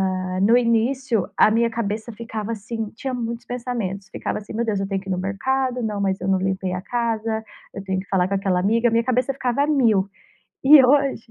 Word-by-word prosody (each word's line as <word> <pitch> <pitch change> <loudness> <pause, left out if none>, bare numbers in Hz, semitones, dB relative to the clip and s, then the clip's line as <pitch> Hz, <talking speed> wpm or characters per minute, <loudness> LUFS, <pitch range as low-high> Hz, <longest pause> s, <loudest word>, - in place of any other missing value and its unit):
Ah, 185 0 -3
no 225 +5 +5
início, 235 -1 +1
a - - +6
minha 230 +1 +2
cabeça 225 0 -3
ficava 225 -1 -5
assim, 225 0 -4
tinha 265 +2 -4
muitos 235 -1 -4
pensamentos, 230 -6 -4
ficava - - -3
assim: 210 - -10
"Meu 235 +2 -1
Deus, 210 -3 -1
eu 195 - -2
tenho 195 -1 -2
que 195 - -10
ir - - -1
no 185 - 0
mercado. 255 +6 -1
Não, 210 -2 -2
mas 195 -1 0
eu 185 - -3
não 195 -1 +3
limpei 190 -1 -2
a 180 - -3
casa. 225 -1 -2 0.3
Eu 195 - -7
tenho 190 -1 -2
que 195 - -15
falar 185 -2 +2
com 195 - -1
aquela 190 -2 +1
amiga". 230 +5 +2
Minha 230 +1 +2
cabeça 255 +2 +1
ficava 255 +1 0
a - - 0
mil. 230 -10 +3 0.6
E 275 0 +9
hoje 275 -2 +2
225 Hz, 225 wpm, -22 LUFS, 195-245 Hz, 0.6 s, E